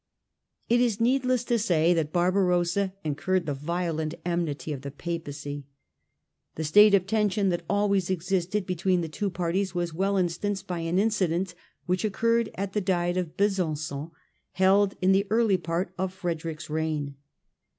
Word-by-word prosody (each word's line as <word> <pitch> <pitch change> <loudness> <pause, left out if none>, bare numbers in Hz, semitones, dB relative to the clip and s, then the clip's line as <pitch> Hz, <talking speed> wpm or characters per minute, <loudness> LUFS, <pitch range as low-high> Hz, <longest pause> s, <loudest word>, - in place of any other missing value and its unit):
It 240 +1 +3
is 235 -4 +1
needless 255 +1 +2
to 240 -1 +1
say 175 -5 +3
that 160 -3 -1
Barbarossa 180 +1 +2
incurred 170 +5 0
the 145 - -1
violent 160 +1 -2
enmity 165 -3 -2
of 135 - -6
the 140 - -6
Papacy. 145 -2 -6 0.9
The 160 - -3
state 205 +7 +7
of 185 -2 +2
tension 205 -1 +1
that 175 -1 -1
always 200 -3 +1
existed 185 +2 -1
between 185 0 +1
the 165 - -3
two 200 +6 -2
parties 180 +1 -1
was 175 -2 -1
well 195 +4 0
instanced 190 +2 -1
by 180 -2 -3
an 165 +2 -1
incident 190 -4 +1 0.3
which 180 +2 0
occurred 230 +2 +1
at 195 0 -4
the 210 - 0
Diet 175 -2 0
of 180 -3 -3
Besanon, 160 -7 -1 0.4
held 195 +1 +3
in 185 - +5
the 195 +1 +3
early 220 -3 +3
part 170 +1 -3
of 190 0 -1
Frederick's 165 -4 -4
reign. 155 -2 -2
180 Hz, 155 wpm, -27 LUFS, 165-200 Hz, 0.9 s, state